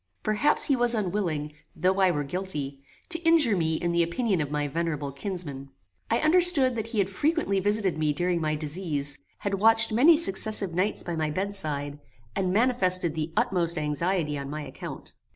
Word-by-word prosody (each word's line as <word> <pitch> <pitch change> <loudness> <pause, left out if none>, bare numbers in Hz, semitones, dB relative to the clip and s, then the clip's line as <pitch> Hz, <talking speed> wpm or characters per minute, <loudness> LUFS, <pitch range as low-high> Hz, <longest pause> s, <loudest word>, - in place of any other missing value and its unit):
Perhaps 215 +8 +2
he 275 - +2
was 240 -1 +2
unwilling, 175 -7 -3 0.2
though 185 +4 0
I 190 -1 +4
were 145 -4 -1
guilty, 145 -4 -4 0.3
to 335 -2 +1
injure 325 -10 +4
me 160 -3 0
in 170 +2 -2
the 170 0 +1
opinion 185 +2 -1
of 145 - -4
my 150 0 -2
venerable 150 -2 -3
kinsman. 140 -3 -5 0.4
I 230 - +2
understood 310 -6 +4
that 220 -1 -4
he 230 - -6
had 195 -2 +2
frequently 285 - -1
visited 200 -4 -1
me 155 -1 +1
during 175 +3 -1
my 155 -1 -1
disease, 150 -2 -1 0.2
had 200 - -4
watched 225 +2 +5
many 290 +9 +5
successive 205 - +3
nights 185 +5 -1
by 175 - -5
my 155 -1 -2
bedside, 150 -6 -3 0.4
and 185 -2 -1
manifested 185 -7 +2
the 155 0 -4
utmost 170 -2 0
anxiety 150 0 -2
on 140 0 -7
my 150 +1 -6
account. 145 - -10
180 Hz, 175 wpm, -26 LUFS, 155-215 Hz, 0.4 s, watched